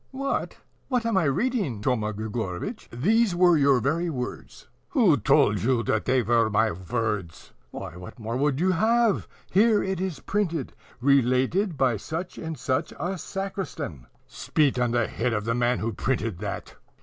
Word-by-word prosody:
"What! 275 +1 -3 0.3
what 250 -3 0
am 230 -2 +1
I 190 -4 +3
reading, 190 - 0
Thoma 110 -4 0
Grigorovitch? 110 - -5
These 200 - +2
were 175 -1 +5
your 140 -3 +4
very 165 +7 0
words." 125 -5 -6 0.2
"Who 220 - +4
told 105 -4 +3
you 120 0 +1
that 110 0 0
they 130 -1 +2
were 115 0 +3
my 110 +1 +2
words?" 100 -1 -4 0.2
"Why, 80 - -7
what 90 0 -10
more 115 0 -4
would 140 +1 +1
you 185 +2 +3
have? 225 +4 +2 0.2
Here 215 +2 +4
it 190 -1 -2
is 185 -7 -3
printed: 170 -8 -2 0.3
RELATED 140 - +2
BY 130 -4 +2
SUCH 165 - -5
AND 160 -1 -5
SUCH 140 +4 -1
A 185 +2 -2
SACRISTAN." 190 - -5 0.2
"Spit 145 -5 0
on 125 -1 +2
the 120 -1 +1
head 120 +1 -1
of 105 -1 -2
the 115 - +1
man 120 +1 +1
who 115 0 -2
printed 115 -4 -2
that! 105 -1 -6
135 Hz, 165 wpm, -26 LUFS, 115-185 Hz, 0.3 s, were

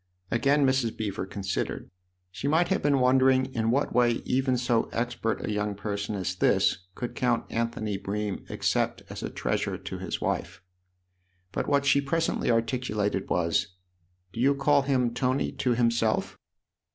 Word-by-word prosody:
Again 140 +4 +3
Mrs. 130 -4 +1
Beever 100 -3 -3
considered: 95 0 -3 0.4
she 130 - -4
might 160 +4 +3
have 190 - +1
been 145 -1 +3
wondering 130 0 +3
in 115 -1 0
what 135 +5 +1
way 120 -1 +2
even 130 0 +1
so 120 -2 +1
expert 115 -1 -2
a - - -2
young 105 0 -1
person 100 0 -3
as 95 -2 -2
this 90 0 +2
could 120 - -4
count 120 -2 0
Anthony 115 -3 -2
Bream 105 0 -3
except - - 0
as - - -6
a - - -3
treasure - - -2
to - - -7
his - - -4
wife. - - -3 0.9
But - - -2
what 140 -1 +2
she 140 0 +4
presently 165 +4 0
articulated 115 -4 0
was: 90 0 0 0.6
"Do 115 - -7
you 140 +3 +4
call 140 +1 +3
him 130 -3 +1
f - - -11
Tony 130 +2 0
' - - -17
to 125 -3 +2
himself?" 115 -2 +1
120 Hz, 165 wpm, -27 LUFS, 105-135 Hz, 0.9 s, she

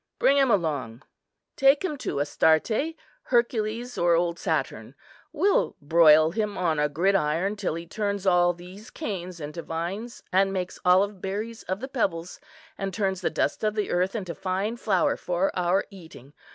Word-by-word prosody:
Bring 280 - +4
him 270 -2 +4
along; 145 - -1 0.5
take 275 +5 +4
him 305 - -2
to 140 - -3
Astarte, 190 - +1 0.3
Hercules, 235 0 0
or 175 -1 +4
old 170 0 0
Saturn. - - -2 0.4
We'll 370 +6 +1
broil 155 +1 +5
him 210 +1 -2
on 165 -4 0
a 150 0 +2
gridiron 175 +3 +1
till 200 -6 -2
he 170 +1 -6
turns 200 +1 -3
all 175 -1 +4
these 180 +4 -12
canes 180 -4 -5
into 150 +2 -6
vines, 185 +10 -5
and 195 +1 +3
makes 185 -2 -4
olive 190 +2 +3
berries 215 +4 -4
of 185 +3 -4
the 265 - -4
pebbles, 180 -10 -2 0.4
and 195 0 -2
turns 190 -1 -1
the - - 0
dust - - -1
of 215 0 0
the 210 -2 -1
earth 185 +4 0
into 185 -6 -4
fine 195 +5 -2
flour 195 -7 +1
for 180 +2 -1
our 180 +2 +1
eating. 160 -7 -13
190 Hz, 165 wpm, -26 LUFS, 170-215 Hz, 0.5 s, broil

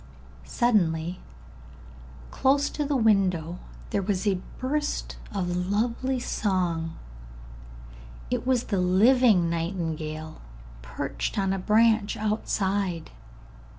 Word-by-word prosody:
Suddenly, 180 -7 +1 1.1
close 280 +2 +2
to 300 - -2
the 290 0 -1
window, 185 -7 +2 0.3
there 200 - +1
was 190 0 -1
a 190 -3 +1 0.2
burst 295 +3 -2
of 180 -3 -2
lovely 240 +5 0
song; 175 -8 -1 1.3
it - - 0
was 255 -2 +2
the 200 -3 -1
living 205 +1 +4
nightingale, 160 -2 -4 0.4
perched - - -4
on 195 -1 +1
a 195 - -2
branch 215 +1 +3
outside. 200 -4 -1
195 Hz, 95 wpm, -26 LUFS, 170-230 Hz, 1.3 s, living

